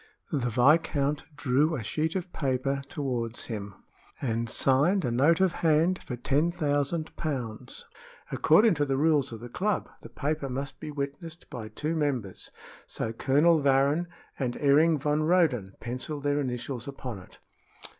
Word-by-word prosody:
The 125 -5 0
viscount 145 +3 +2
drew 150 +3 +2
a 125 - -4
sheet 155 - -1
of 180 -1 -4
paper 135 0 -1
toward 125 -7 -3
him 100 -4 -5 0.4
and 115 -3 -1
signed 145 +11 +2
a 120 - 0
note 145 +8 +4
of 190 -2 +3
hand 165 +3 +3
for 125 - -5
ten 145 +7 +1
thousand 155 -1 -1
pounds. 125 -9 -5 0.5
According 210 +7 +5
to 145 -3 0
the 135 -1 0
rules 145 -3 +2
of 115 -1 -8
the 120 - -7
club, 195 - -1
the - - -11
paper 150 -1 -2
must 135 +1 -5
be - - -6
witnessed 150 +4 -6
by 115 -3 -6
two 150 +9 -3
members, 130 - -2 0.4
so 115 - -3
Colonel 150 +7 +3
Varrin 140 +5 +3 0.3
and 125 -3 -1
Ering 150 +3 +4
van 150 +2 +1
Roden 155 - +2
penciled 130 +5 -4
their 145 0 +1
initials 125 -1 -4
upon 130 -6 -6
it. 90 - -15
140 Hz, 155 wpm, -28 LUFS, 125-155 Hz, 0.5 s, According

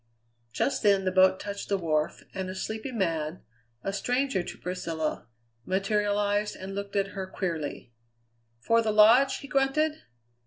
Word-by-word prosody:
Just 195 - 0
then 200 -3 +3
the 185 - +2
boat 185 0 +5
touched 200 -1 -6
the 200 - +2
wharf, 155 -4 -1
and 190 -1 -4
a 185 - -5
sleepy 220 +6 -4
man, 165 -7 -2 0.4
a 195 - -2
stranger 250 0 0
to 175 - -8
Priscilla, 165 -6 -3 0.4
materialized 205 - 0
and 190 +1 -7
looked 200 0 -5
at 195 -1 +1
her 195 -2 -5
queerly. 165 -10 -4 0.7
"For 230 - +3
the 220 - -1
Lodge?" 230 +6 +6
he 280 - -9
grunted. 295 +3 +1
200 Hz, 150 wpm, -28 LUFS, 185-220 Hz, 0.7 s, Lodge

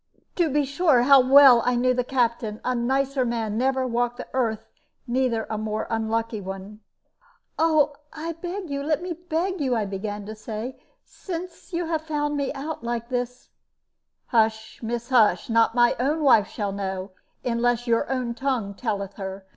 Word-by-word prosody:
To 345 -3 +3
be 290 +1 +1
sure, 280 -3 +3
how 275 +1 +7
well 260 -2 +8
I 250 - +1
knew 255 +1 +2
the 250 0 0
Captain! 235 -4 -1
A 255 - +1
nicer 265 +2 0
man 230 -3 -2
never 260 +2 +1
walked 245 0 -1
the - - -7
earth, 225 -4 -1 0.4
neither 245 -3 0
a 215 - -3
more 215 0 -2
unlucky 225 0 -1
one." 195 +2 -8 0.8
"I 310 +1 0
beg 360 -2 -5
you 280 0 -2
let 305 +3 0
me 360 -1 -3
beg 350 +2 -2
you," 260 -3 +1
I 220 -2 0
began 205 +1 -5
to 215 - -6
say; 220 +3 -6 0.2
"since 360 +1 -8
you 345 0 -1
have 320 -1 -1
found 295 -2 -2
me 280 -2 -1
out 295 -1 -5
like 235 0 -3
this 245 -1 -4 0.4
" - - -55
"Hush, 220 -2 0
miss, 235 +1 -4
hush! 220 -6 +3
Not 230 +1 +3
my 240 0 +4
own 300 +5 0
wife 225 -7 +5
shall 205 -3 -3
know, 190 -1 -4 0.3
unless 240 0 +1
your 235 +1 +1
own 250 -3 -1
tongue 240 -5 -2
telleth 200 -3 -4
her. 190 -1 -6
245 Hz, 170 wpm, -24 LUFS, 220-280 Hz, 0.8 s, well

